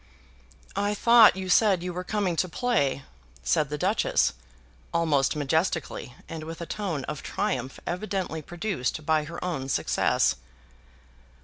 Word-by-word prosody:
"I 205 +1 0
thought 235 -1 +7
you 190 0 -5
said 190 -1 +4
you 180 0 -3
were 180 +1 -4
coming 195 -2 -1
to 185 - +1
play," 165 - 0 0.4
said 75 - +1
the 150 - -3
Duchess, 195 +8 +2 0.6
almost 155 -5 +2
majestically, 150 -3 -1
and 160 -1 -6
with 165 +1 -7
a 170 - -4
tone 170 -8 -3
of 150 +1 -5
triumph 185 - -2
evidently 180 -3 -3
produced 170 -4 -3
by 155 -1 +2
her 170 +2 -8
own 135 -7 -3
successes. - - +2
170 Hz, 135 wpm, -27 LUFS, 150-195 Hz, 0.6 s, thought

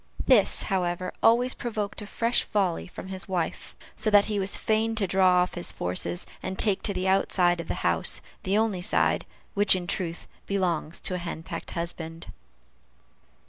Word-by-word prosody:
This, 230 -7 +4
however, 180 -1 -2
always 245 +3 +4
provoked 215 -3 -4
a 210 - -8
fresh 230 +3 +1
volley 190 -5 -1
from 190 - -9
his 190 0 -4
wife, 175 -3 -3 0.2
so 215 - 0
that 205 -1 +6
he 210 -2 -2
was 195 0 +2
fain 225 +1 0
to 215 -3 +1
draw 185 -1 +4
off 180 - -5
his 175 - -2
forces, 90 - -3 0.2
and 190 0 -5
take 205 -3 +6
to 200 - +2
the 185 +1 -1
outside 180 -2 +2
of 165 - -11
the - - -2
house 85 -1 +1 0.2
the 195 +2 0
only 215 -5 0
side - - +1 0.3
which, 205 -1 +4
in 180 -1 -3
truth, 170 -1 -3 0.2
belongs 175 -4 -1
to - - -2
a 180 - -2
henpecked 170 -2 -6
husband. 165 -1 -5
190 Hz, 175 wpm, -26 LUFS, 175-205 Hz, 0.3 s, that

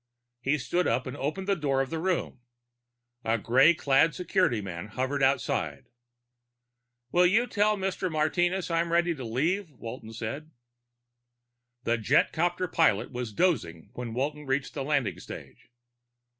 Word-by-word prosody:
He 135 +4 +1
stood 175 +5 0
up 125 - +1
and 130 - -5
opened 155 +8 -3
the 200 - +3
door 140 -5 0
of 135 -1 -1
the 165 - -2
room. 180 -7 -1 0.8
A 115 +1 +1
gray 130 +9 +5
clad 145 +2 +3
security 180 - +1
man 90 -2 -6
hovered 130 +6 -2
outside. 135 -3 0 1.2
"Will 180 0 +5
you 220 +7 +3
tell 210 -2 +2
Mr. 190 -1 -2
Martinez 175 +4 +1
I'm 165 0 +1
ready 170 0 +3
to 135 -5 -7
leave?" 160 - -1
Walton 115 -4 -9
said. 115 +8 -5 1.3
The 120 0 +1
jetcopter 170 +9 +2
pilot 160 - +2
was 125 -3 -4
dozing 105 - 0
when 120 -2 -6
Walton 145 +3 -2
reached 135 0 -1
the - - -3
landing 140 -5 0
stage. - - -11
145 Hz, 145 wpm, -28 LUFS, 125-175 Hz, 1.3 s, gray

